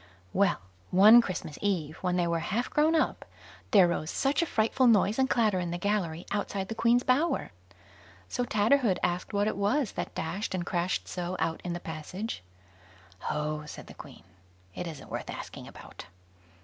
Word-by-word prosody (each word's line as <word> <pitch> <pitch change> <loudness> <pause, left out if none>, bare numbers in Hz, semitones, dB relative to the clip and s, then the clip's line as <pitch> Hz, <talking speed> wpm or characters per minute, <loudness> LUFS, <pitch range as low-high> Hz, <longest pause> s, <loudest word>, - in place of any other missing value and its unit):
Well, 200 +1 +2 0.3
one 215 +6 +8
Christmas 180 -8 -5
eve, 170 -7 -1
when 180 -1 -1
they 175 -1 +2
were 170 -1 0
half 230 +9 -2
grown 310 +2 +3
up, 315 - +1 0.5
there 190 -4 +6
rose 160 -2 -2
such 275 +3 +1
a 335 - 0
frightful 230 +3 +2
noise 215 0 +4
and 265 0 +3
clatter 215 -6 +2
in 175 -1 -2
the 175 - -3
gallery 175 -4 -1
outside 200 -1 -2
the - - -2
Queen's 235 +2 +3
bower. 285 +7 +1 0.8
So 245 - -2
Tatterhood 225 -1 +2
asked 175 0 -1
what 205 0 +1
it - - -1
was 210 +6 +1
that - - -5
dashed 190 +5 -3
and 175 -2 -3
crashed 175 +1 -1
so 180 0 -4
out 165 0 -1
in 175 - -3
the 175 - -4
passage. 170 - -6 0.9
"Oh!" 150 0 -2
said - - -9
the - - -12
Queen, - - -13 0.5
"it 175 - -5
isn't 155 -4 -9
worth - - -5
asking - - -7
about." - - -12
195 Hz, 175 wpm, -29 LUFS, 175-230 Hz, 0.9 s, one